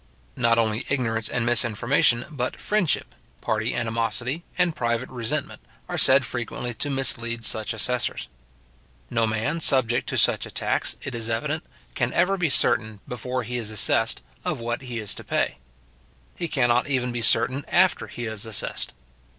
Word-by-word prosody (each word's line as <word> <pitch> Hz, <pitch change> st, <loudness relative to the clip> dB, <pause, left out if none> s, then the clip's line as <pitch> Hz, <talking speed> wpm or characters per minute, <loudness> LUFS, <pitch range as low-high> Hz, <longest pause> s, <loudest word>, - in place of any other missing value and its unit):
Not 115 Hz, -1 st, +3 dB
only 110 Hz, 0 st, +1 dB
ignorance 115 Hz, -5 st, 0 dB
and 120 Hz, -2 st, -1 dB
misinformation, 120 Hz, +2 st, +3 dB
but 130 Hz, -4 st, -3 dB
friendship, 180 Hz, -, 0 dB, 0.3 s
party 110 Hz, +2 st, -1 dB
animosity, 120 Hz, +6 st, -1 dB
and 175 Hz, -3 st, +2 dB
private 120 Hz, +1 st, -1 dB
resentment, 130 Hz, +4 st, -3 dB, 0.3 s
are -, -, -4 dB
said 130 Hz, -1 st, +5 dB
frequently 120 Hz, +1 st, -4 dB
to 145 Hz, +6 st, -3 dB
mislead 115 Hz, -4 st, 0 dB
such 110 Hz, +1 st, +1 dB
assessors. 120 Hz, +3 st, -1 dB, 0.8 s
No 115 Hz, -1 st, +2 dB
man 110 Hz, +9 st, -1 dB
subject 125 Hz, -6 st, +3 dB
to -, -, -2 dB
such -, -, +3 dB
a -, -, -11 dB
tax, -, -, 0 dB
it 135 Hz, -, -5 dB
is 115 Hz, -1 st, -2 dB
evident, 145 Hz, +8 st, -1 dB, 0.3 s
can 120 Hz, -1 st, 0 dB
ever 180 Hz, +3 st, +3 dB
be 175 Hz, -4 st, 0 dB
certain, 110 Hz, -5 st, +2 dB
before 125 Hz, +1 st, -3 dB
he 125 Hz, +2 st, -3 dB
is 115 Hz, -3 st, -1 dB
assessed, 110 Hz, -2 st, +2 dB, 0.2 s
of -, -, -2 dB
what 120 Hz, +1 st, -3 dB
he 125 Hz, -3 st, -6 dB
is 105 Hz, -3 st, 0 dB
to -, -, -8 dB
pay. -, -, -1 dB, 0.8 s
He 170 Hz, -, -3 dB
cannot 125 Hz, -4 st, +2 dB
even 130 Hz, -3 st, 0 dB
be 120 Hz, 0 st, -3 dB
certain 130 Hz, +4 st, +3 dB
after 185 Hz, +1 st, +3 dB
he 120 Hz, -, -6 dB
is 110 Hz, -1 st, -5 dB
assessed. 110 Hz, -, -2 dB
120 Hz, 160 wpm, -25 LUFS, 115-135 Hz, 0.8 s, said